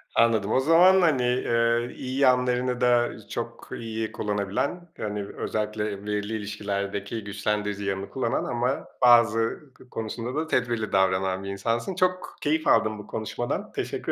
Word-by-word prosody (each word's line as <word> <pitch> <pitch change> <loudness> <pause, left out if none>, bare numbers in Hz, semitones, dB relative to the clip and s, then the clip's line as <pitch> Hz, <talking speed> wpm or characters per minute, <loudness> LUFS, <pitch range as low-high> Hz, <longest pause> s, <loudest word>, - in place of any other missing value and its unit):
anladım. 110 -3 +3
O - - +4
zaman, 175 +6 +6
hani, 145 -7 +3
eee, 120 -1 +1
iyi 130 +1 -4
yanlarını 125 -1 +2
da 120 -1 +4 0.2
çok - - -6
iyi 110 -1 -4
kullanabilen, 105 - -2
hani, 105 -1 -3
özellikle, 105 +1 -3
eee, 100 0 -7
belirli 105 +1 -2
ilişkilerdeki 100 0 -3
güçlendirici 100 0 -2
yanını 100 0 -3
kullanan 130 - -1
ama 125 +3 -1
bazı 120 +3 +4
k 125 - -19
konusunda 115 +3 -4
da 155 +1 -1
tedbirli 120 -7 0
davranan 95 0 +1
bir 100 - -5
insansın. 115 - -2
Çok 185 0 0
keyif 155 +2 0
aldım 110 -1 +3
bu 105 - -10
konuşmadan, 110 +2 -3
teşekkür - - -3
115 Hz, 145 wpm, -26 LUFS, 105-125 Hz, 0.2 s, zaman